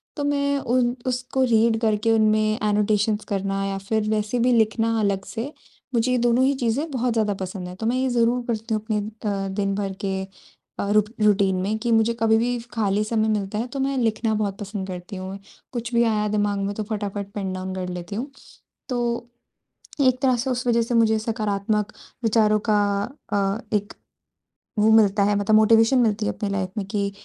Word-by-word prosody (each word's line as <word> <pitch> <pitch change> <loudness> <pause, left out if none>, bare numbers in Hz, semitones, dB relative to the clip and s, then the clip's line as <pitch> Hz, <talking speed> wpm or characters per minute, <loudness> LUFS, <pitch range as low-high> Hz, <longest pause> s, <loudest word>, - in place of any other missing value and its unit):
तो 290 - -3
मैं 280 0 +1
उन 245 -1 +1
उसको 255 +1 -1
रीड 225 0 +3
करके 220 0 +2
उनमें 215 0 +3
एनोटेशंस 210 +1 +1
करना 195 0 -1
या 195 0 -2
फ़िर 215 +2 -1
वैसे 215 +2 0
भी 250 +2 +3
लिखना 225 0 +2
अलग 200 -2 0
से। 245 +6 -5 0.4
मुझे 235 +1 +2
ये 250 - +2
दोनों 240 +1 +3
ही 275 - +3
चीज़ें 260 +5 -1
बहुत 250 -2 0
ज़्यादा 215 -2 +1
पसंद 185 -1 -5
हैं। 180 - -8
तो 220 - -4
मैं 235 +2 +1
ये 260 0 +1
ज़रूर 240 0 +2
करती 225 -1 -2
हूँ 215 - 0
अपने 220 -1 -1
अ, 205 -2 -3
दिन-भर 195 -1 -1
के 190 -1 -1 0.6
अ, 200 - -1
रू 210 0 +5 0.2
रूटीन 200 -2 +3
में 205 +3 -1
कि 235 +1 -1
मुझे 225 +1 +3
कभी 220 0 +4
भी 245 +2 0 0.2
खाली 210 -2 +1
समय 220 0 0
मिलता 195 +1 -5
है, 230 +3 -2
तो 270 +2 -6
मैं 270 0 0
लिखना 225 -2 +1
बहुत 205 -2 -2
पसंद 200 -2 -5
करती 180 +2 -7
हूँ। 190 +1 -6 0.4
कुछ 240 0 -4
भी 235 0 +4
आया 215 -2 +1
दिमाग़ 205 -1 0
में 200 +1 -2
तो 215 - -3
फटाफट 205 -2 -4
पेन 195 -2 -3
डाउन 185 0 -4
कर 185 -1 -3
लेती 180 +2 -6
हूँ। 265 +6 -4 0.6
तो 240 -1 -2 0.7
एक 255 -2 +3
तरह 260 -2 +3
से 250 +3 -2
उस 250 0 -2
वजह 235 -1 +3
से 235 +2 -2
मुझे 220 -1 +4
सकारात्मक 215 -1 -1 0.3
विचारों 215 -1 +3
का 210 - +4 0.6
अ, 200 0 +1 0.2
एक 205 0 -1 0.9
वो 215 +1 +4
मिलता 210 -2 +5
है 205 +1 +2
मतलब 205 +1 +2
मोटिवेशन 225 +4 +5
मिलती 215 -3 +1
है - - +1
अपनी 205 - -3
लाइफ़ 195 -2 -2
में 200 - -2
कि 200 0 -1
215 Hz, 200 wpm, -23 LUFS, 200-235 Hz, 0.9 s, रू